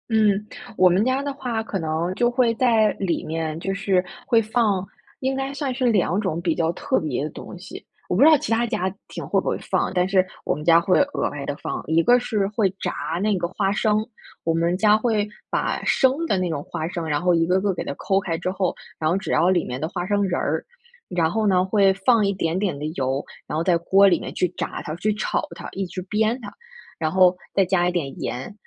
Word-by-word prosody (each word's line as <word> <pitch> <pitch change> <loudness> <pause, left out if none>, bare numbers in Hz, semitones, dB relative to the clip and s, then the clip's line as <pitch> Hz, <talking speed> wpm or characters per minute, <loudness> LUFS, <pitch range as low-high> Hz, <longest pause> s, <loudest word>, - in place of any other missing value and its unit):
嗯， 210 -2 +2 0.3
我 185 0 +6
们 185 +4 +3
家 260 +2 +1
的 285 -1 -3
话 245 -5 -3
可 200 -3 -4
能 160 +2 -1
就 240 +3 +2
会 240 -1 +2
在 225 -4 +3
里 185 -4 -1
面， 160 0 -3
就 195 +3 -2
是 195 -2 +1 0.2
会 230 -3 +4
放 215 -4 +1 0.4
应 265 0 0
该 270 +1 -3
算 280 -2 -2
是 255 0 -1
两 205 -5 +2
种 185 -5 -2
比 170 -2 +1
较 165 0 +1
特 - - 0
别 145 -4 -2
的 150 - -3
东 180 - -10
西， 185 +2 -10 0.2
我 - - 0
不 - - +2
知 290 - +8
道 310 - +7
其 260 - -5
他 230 +1 +2
家 190 -5 -1
庭 - - -7
会 - - +1
不 - - -5
会 - - 0
放， - - -1
但 180 -1 +2
是 190 -1 +3 0.2
我 - - 0
们 150 +1 -7
家 165 0 +6
会 185 +1 +3
额 285 0 0
外 140 -1 -6
地 145 - -3
放。 - - -4
一 160 +1 +3
个 245 +5 +5
是 215 -5 -1
会 210 -2 +1
炸 180 - -1 0.3
那 210 -2 +2
个 175 -1 -1
花 195 +2 -1
生， 215 +1 +1 0.4
我 165 - +1
们 170 +2 +1
家 210 +1 +5
会 220 -2 +1 0.2
把 - - -1
生 270 +5 +2
的 200 - +1
那 185 -1 -1
种 155 -3 -2
花 160 -2 -3
生， 170 -2 -4
然 150 -1 0
后 180 0 +3
一 165 -1 +3
个 185 +2 +2
个 200 -1 +1
给 - - -5
它 - - -3
抠 195 +6 0
开 170 -4 -3
之 180 +2 -2
后， 190 -1 -1 0.2
然 155 - +1
后 170 - +2
只 195 - -3
要 175 - +3
里 180 -3 +2
面 125 +1 -5
的 155 - -2
花 175 +1 -4
生 205 +1 +1
仁 185 -3 0
儿， - - -1 0.4
然 165 -2 0
后 220 +1 0
呢， 185 -2 +3
会 195 0 +3
放 210 +3 +3
一 200 - +1
点 170 -1 -1
点 190 -7 -1
的 145 - -5
油， 135 +1 -1 0.2
然 - - -4
后 160 - 0
在 175 -1 +3
锅 190 +4 +4
里 - - +2
面 - - -7
去 180 - +1
炸 - - -4
它， 155 - -5
去 215 +4 0
炒 210 - -2
它， - - -8
一 195 - -3
直 185 +1 -6
煸 215 +5 0
它， 205 - -8 0.5
然 155 - 0
后 185 -1 +5 0.2
再 195 - +5
加 180 -1 +2
一 - - +1
点 140 -7 -3
盐， 130 +11 -4
190 Hz, 265 characters per minute, -23 LUFS, 170-215 Hz, 0.5 s, 知